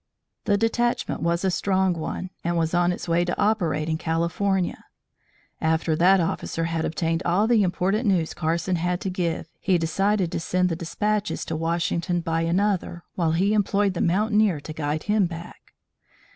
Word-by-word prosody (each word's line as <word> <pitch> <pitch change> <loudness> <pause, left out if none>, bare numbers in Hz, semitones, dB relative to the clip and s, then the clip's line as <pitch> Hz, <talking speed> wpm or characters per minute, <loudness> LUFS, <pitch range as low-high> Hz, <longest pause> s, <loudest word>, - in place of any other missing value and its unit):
The 205 - +3
detachment 240 +2 0
was 170 +2 0
a 190 - +2
strong 190 0 +1
one 175 +3 -5
and 170 0 0
was 165 0 0
on 175 0 +3
its 175 - -5
way 170 +1 +2
to 175 0 -3
operate 180 -8 +1
in 160 -1 -1
California. 170 +3 -1 0.8
After 160 0 +1
that 185 +4 +5
officer 165 -1 -2
had 165 -1 -1
obtained 165 +1 -1
all 180 +5 +2
the 225 -1 +4
important 195 +5 0
news 175 -5 +1
Carson 170 +2 -1
had 175 +1 -1
to 190 - -2
give, 175 -3 -2
he 185 -3 +2
decided 190 +3 0
to - - -2
send 180 +2 +1
the 165 - -1
despatches 210 +5 -2
to 160 - -3
Washington 170 +2 -1
by 165 -1 -1
another, 175 0 0
while 165 -3 0
he 195 +5 +2
employed 205 -1 +2
the 175 - -3
mountaineer 210 -1 +2
to 155 - -7
guide 155 0 -2
him 210 -3 +2
back. 170 0 -10
175 Hz, 170 wpm, -24 LUFS, 165-195 Hz, 0.8 s, that